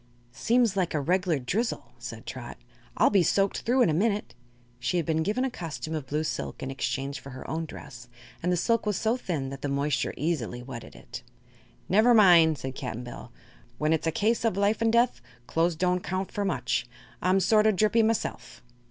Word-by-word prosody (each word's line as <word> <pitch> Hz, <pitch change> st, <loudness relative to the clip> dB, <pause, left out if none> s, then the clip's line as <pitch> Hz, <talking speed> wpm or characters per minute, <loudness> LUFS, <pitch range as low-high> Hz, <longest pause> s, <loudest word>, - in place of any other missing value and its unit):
"Seems 230 Hz, -, +2 dB
like 180 Hz, -4 st, 0 dB
a -, -, +2 dB
reg'lar 175 Hz, +2 st, +1 dB
drizzle," 205 Hz, -, -2 dB
said -, -, -8 dB
Trot. -, -, -7 dB, 0.4 s
"I'll -, -, +4 dB
be 200 Hz, -3 st, +5 dB
soaked 195 Hz, +3 st, +1 dB
through 250 Hz, +2 st, +3 dB
in 190 Hz, -, +3 dB
a -, -, 0 dB
minute." 205 Hz, +5 st, 0 dB, 0.5 s
She 120 Hz, +9 st, 0 dB
had 170 Hz, -, 0 dB
been 160 Hz, -1 st, +1 dB
given 215 Hz, +10 st, 0 dB
a 265 Hz, -, -2 dB
costume 160 Hz, -5 st, -6 dB
of 150 Hz, -4 st, -4 dB
blue 150 Hz, +3 st, -1 dB
silk, -, -, -4 dB
in 135 Hz, -, -3 dB
exchange 135 Hz, +2 st, -3 dB
for 135 Hz, -, -11 dB
her 130 Hz, -1 st, -9 dB
own 160 Hz, +1 st, -2 dB
dress, 120 Hz, -5 st, -11 dB, 0.3 s
and 180 Hz, -, 0 dB
the 180 Hz, -, +2 dB
silk 230 Hz, +4 st, +1 dB
was 205 Hz, -3 st, +1 dB
so 225 Hz, +3 st, +1 dB
thin 155 Hz, -, -3 dB
that 135 Hz, -1 st, -8 dB
the 145 Hz, -, -2 dB
moisture 140 Hz, +1 st, 0 dB
easily 130 Hz, -6 st, -2 dB
wetted 120 Hz, -3 st, -9 dB
it. -, -, -9 dB, 0.7 s
"Never 220 Hz, +5 st, +5 dB
mind," 170 Hz, -7 st, +6 dB
said 130 Hz, +1 st, -5 dB
Cap'n 125 Hz, -2 st, -5 dB
Bill. 120 Hz, 0 st, -9 dB, 0.5 s
"When 155 Hz, +1 st, +1 dB
it's 160 Hz, 0 st, 0 dB
a -, -, +2 dB
case 225 Hz, +7 st, +1 dB
of 225 Hz, -5 st, +1 dB
life 205 Hz, +3 st, +2 dB
'n' 230 Hz, -, +3 dB
death, 235 Hz, +2 st, +2 dB, 0.2 s
clo's 165 Hz, +4 st, +1 dB
don't 180 Hz, +2 st, +1 dB
count 185 Hz, +1 st, -3 dB
for 205 Hz, -, -2 dB
much. 125 Hz, -8 st, -1 dB, 0.3 s
I'm 185 Hz, +1 st, +3 dB
sort 215 Hz, +3 st, +4 dB
o' -, -, +6 dB
drippy 215 Hz, +3 st, +3 dB
myself." 225 Hz, -, -2 dB
175 Hz, 205 wpm, -27 LUFS, 140-210 Hz, 0.7 s, mind